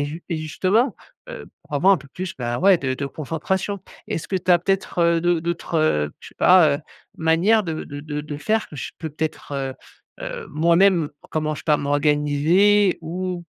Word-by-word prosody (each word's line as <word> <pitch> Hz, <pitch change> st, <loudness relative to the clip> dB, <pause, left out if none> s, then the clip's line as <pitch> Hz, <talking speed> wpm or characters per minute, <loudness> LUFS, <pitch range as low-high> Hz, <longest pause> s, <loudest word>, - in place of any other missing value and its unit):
et -, -, 0 dB
jus 160 Hz, +4 st, -7 dB
et 165 Hz, -, -1 dB
justement, 185 Hz, -, +1 dB, 0.4 s
heu, -, -, -8 dB, 0.2 s
pour 150 Hz, -, -9 dB
avoir 190 Hz, +7 st, +5 dB
un 180 Hz, -, -3 dB
peu 140 Hz, 0 st, -15 dB
plus 185 Hz, +5 st, -6 dB
ben, 120 Hz, -1 st, -3 dB
ouais 190 Hz, -1 st, +6 dB
de 130 Hz, -1 st, -2 dB
de 140 Hz, +1 st, -4 dB
concentration. 175 Hz, +8 st, -3 dB, 0.3 s
Est-ce 165 Hz, -, -4 dB
que 190 Hz, -, 0 dB
tu 185 Hz, 0 st, -2 dB
as 175 Hz, -, +7 dB
peut-être, 195 Hz, 0 st, -2 dB
heu, 170 Hz, -1 st, +3 dB
d'au 175 Hz, -2 st, +2 dB
d'autres, 170 Hz, 0 st, -3 dB
heu, 75 Hz, -, +1 dB
je -, -, -11 dB
sais -, -, -20 dB
pas, 170 Hz, -6 st, +6 dB
heu, -, -, -9 dB, 0.4 s
manières 170 Hz, +7 st, +3 dB
de 160 Hz, -3 st, -4 dB
de 145 Hz, 0 st, -8 dB
de 150 Hz, 0 st, -4 dB
de 150 Hz, -1 st, -6 dB
faire 220 Hz, +9 st, -1 dB
que 150 Hz, -, -11 dB
je -, -, -5 dB
peux 160 Hz, -, -4 dB
peut-être, 155 Hz, -1 st, -5 dB
heu, 135 Hz, -1 st, -3 dB, 0.5 s
heu, -, -, -6 dB
moi-même 170 Hz, +1 st, +3 dB, 0.2 s
comment, 155 Hz, -1 st, -1 dB
je -, -, -8 dB
sais -, -, -18 dB
pas, 150 Hz, -2 st, +3 dB
m'organiser 150 Hz, +8 st, +3 dB
ou 175 Hz, +1 st, -4 dB
165 Hz, 210 wpm, -22 LUFS, 150-185 Hz, 0.5 s, as